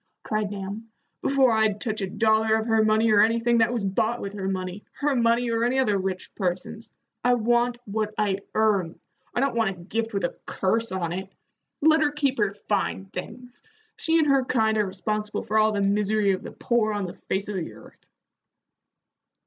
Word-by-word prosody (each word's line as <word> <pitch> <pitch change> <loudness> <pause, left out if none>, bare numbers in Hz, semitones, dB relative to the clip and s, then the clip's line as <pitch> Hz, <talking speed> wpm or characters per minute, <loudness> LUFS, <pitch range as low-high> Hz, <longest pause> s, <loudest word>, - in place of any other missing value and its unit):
cried 215 -1 -1
Nahum 205 +3 -6 0.3
"before 270 -2 +3
I'd 220 -2 +2
touch 215 -2 -1
a 195 - -2
dollar 220 +1 +3
of 220 0 0
her 225 -1 +3
money 215 +1 +3
or 205 -1 +6
anything 230 +2 +3
that 225 +1 +3
was 235 -5 -1
bought 225 +5 0
with 200 0 -5
her 195 -2 -4
money, 185 +1 -4
her 290 -1 0
money 235 0 +2
or 230 0 +1
any 245 +2 +1
other 250 -6 +2
rich 190 -1 -3
person's. 190 +4 -3 0.3
I 245 0 +4
want 240 +1 +1
what 215 +1 -2
I 200 -2 +1 0.2
earn. 200 -6 +1 0.4
I 245 - +1
don't 275 -1 +1
want 225 -3 +1
a 190 -2 -7
gift 225 +5 -3
with 200 - -1
a 175 - -1
curse 225 +4 0
on 175 -3 -2
it. 190 +1 -5 0.5
Let 315 +1 +5
her 295 -1 +2
keep 280 -4 0
her 205 -1 +1
fine 195 -1 -1
things. 245 +6 -8 0.3
She 325 0 +1
and 315 - +4
her 275 -2 +3
kind 220 -3 +1
are 210 - +1
responsible 210 +3 -3
for 215 +1 +1
all 215 0 +4
the 205 -1 -1
misery 205 +1 +2
of 185 - -1
the - - -8
poor 225 -3 0
on 205 -2 -2
the 175 - -6
face 195 +1 -3
of 205 - -4
the 170 - -4
earth." - - -16
215 Hz, 200 wpm, -25 LUFS, 195-235 Hz, 0.5 s, or